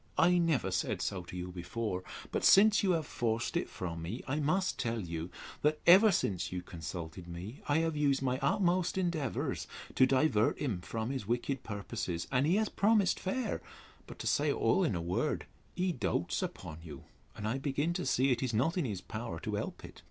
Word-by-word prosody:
—I 175 +1 +5
never 150 - +1
said 90 - -1
so 95 - -2
to 90 - -8
you 90 0 -4
before; 90 +2 -3 0.3
but, - - -1
since 210 +2 +7
you 190 -3 +3
have 160 -3 0
forced 115 0 -1
it - - 0
from 85 -2 -5
me, 95 +10 -5
I 145 +3 0
must 180 +6 +1
tell 115 -2 -1
you, 85 -3 -4 0.3
that, 150 +1 +2
ever 195 +5 +8
since 90 - 0
you 90 0 -4
consulted 85 +1 -7
me, 90 +9 -7
I 145 - +4
have 160 -1 -1
used 140 -2 +2
my 130 0 0
utmost 185 -1 +1
endeavours 170 -8 -1 0.3
to 130 - +5
divert 130 -5 +3
him 110 -11 -2
from 110 +6 -3
his 130 -7 -4
wicked 125 +3 -1
purposes: 100 -5 -4
and 135 +2 +3
he 175 - +3
has 215 +1 +2
promised 205 -2 +3
fair; 220 +3 -2 0.5
but, - - -10
to - - -7
say - - +2
all - - +2
in - - +1
a 85 - -2
word, 90 +2 -1 0.3
he 185 0 +1
doats 90 - -1
upon 80 +1 -5
you; 75 -4 -10 0.3
and 105 - -4
I 125 +5 -1
begin 145 +4 0
to 180 0 -3
see 130 +2 +3
it 120 - +1
is 125 -4 -1
not 160 - +2
in 165 - 0
his 100 -6 -3
power - - -5
to - - -4
help - - -4
it. - - -12
125 Hz, 205 wpm, -32 LUFS, -, 0.5 s, ever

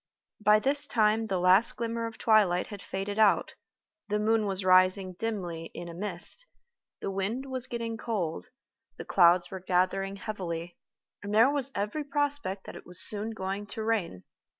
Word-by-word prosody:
By 210 0 +6
this 285 +6 +4
time 220 -1 +1
the 195 -3 -1
last 185 +5 +4
glimmer 230 0 -3
of 225 - -10
twilight 205 -5 +3
had 205 -2 -9
faded 200 +2 -5
out, 215 -2 +3 0.5
the 210 0 0
moon 215 0 +1
was 190 -1 -2
rising 185 +1 +4
dimly 180 -6 -4
in 175 - -7
a 170 - -8
mist, 210 - -1 0.5
the - - -3
wind 200 +7 -3
was 260 -1 -4
getting 230 -2 -4
cold, 200 -9 -3 0.5
the - - -8
clouds 175 -1 +4
were 190 - -6
gathering 185 +2 0
heavily, 175 -5 -6 0.5
and 205 +1 -4
there 230 +5 +5
was 275 -2 +2
every 210 +10 -2
prospect 285 -9 -1
that - - -9
it - - -12
was 180 0 +1
soon 210 +1 +3
going 200 -1 -5
to 220 +1 -5
rain! 200 - -2
205 Hz, 170 wpm, -28 LUFS, 185-225 Hz, 0.5 s, By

